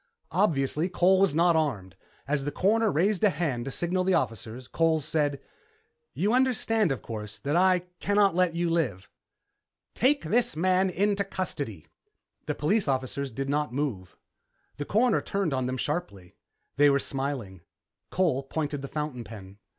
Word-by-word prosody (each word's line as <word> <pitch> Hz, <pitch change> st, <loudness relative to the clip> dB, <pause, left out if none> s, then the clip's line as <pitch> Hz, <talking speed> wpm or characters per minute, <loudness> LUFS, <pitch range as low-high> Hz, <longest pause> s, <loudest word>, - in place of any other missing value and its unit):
Obviously, 160 Hz, -3 st, +1 dB
Cole 185 Hz, +1 st, +3 dB
was 195 Hz, -6 st, +3 dB
not 170 Hz, +1 st, +4 dB
armed. 110 Hz, -, -1 dB, 0.3 s
As 140 Hz, -1 st, 0 dB
the 145 Hz, -, -2 dB
Coroner 215 Hz, +5 st, +2 dB
raised 185 Hz, +5 st, +1 dB
a 210 Hz, -, +6 dB
hand 140 Hz, -10 st, -2 dB
to -, -, -3 dB
signal 180 Hz, +5 st, -1 dB
the 185 Hz, 0 st, +2 dB
officers, 115 Hz, -, -3 dB
Cole 165 Hz, +2 st, +2 dB
said, 145 Hz, -1 st, -1 dB, 0.8 s
"You 205 Hz, +4 st, +1 dB
understand, 225 Hz, -, +2 dB
of 130 Hz, -6 st, -3 dB
course, 105 Hz, -2 st, -7 dB
that 145 Hz, +3 st, -2 dB
I 185 Hz, 0 st, +4 dB, 0.2 s
can't 200 Hz, -2 st, +3 dB
let 180 Hz, -1 st, +1 dB
you 170 Hz, 0 st, 0 dB
live." 130 Hz, -, -1 dB, 0.9 s
"Take 280 Hz, +4 st, +2 dB
this 240 Hz, -7 st, +1 dB
man 185 Hz, +3 st, +2 dB
into 200 Hz, +2 st, +1 dB
custody." 145 Hz, -, -4 dB, 0.6 s
The -, -, -1 dB
police 195 Hz, +7 st, +1 dB
officers 135 Hz, +1 st, -1 dB
did 135 Hz, +3 st, -4 dB
not 150 Hz, -1 st, -1 dB
move. 120 Hz, -11 st, -3 dB, 0.6 s
The 145 Hz, -, -4 dB
Coroner 225 Hz, -, +2 dB
turned 195 Hz, -7 st, -1 dB
on 130 Hz, -1 st, -1 dB
them 130 Hz, 0 st, -2 dB
sharply. 130 Hz, -, -4 dB, 0.4 s
They 145 Hz, +1 st, +6 dB
were 140 Hz, -, +4 dB
smiling. 135 Hz, -, -4 dB, 0.5 s
Cole 170 Hz, -8 st, +1 dB
pointed 145 Hz, +1 st, -3 dB
the 140 Hz, -, -5 dB
fountain 150 Hz, -5 st, -4 dB
pen. 100 Hz, -2 st, -11 dB
155 Hz, 160 wpm, -27 LUFS, 135-185 Hz, 0.9 s, a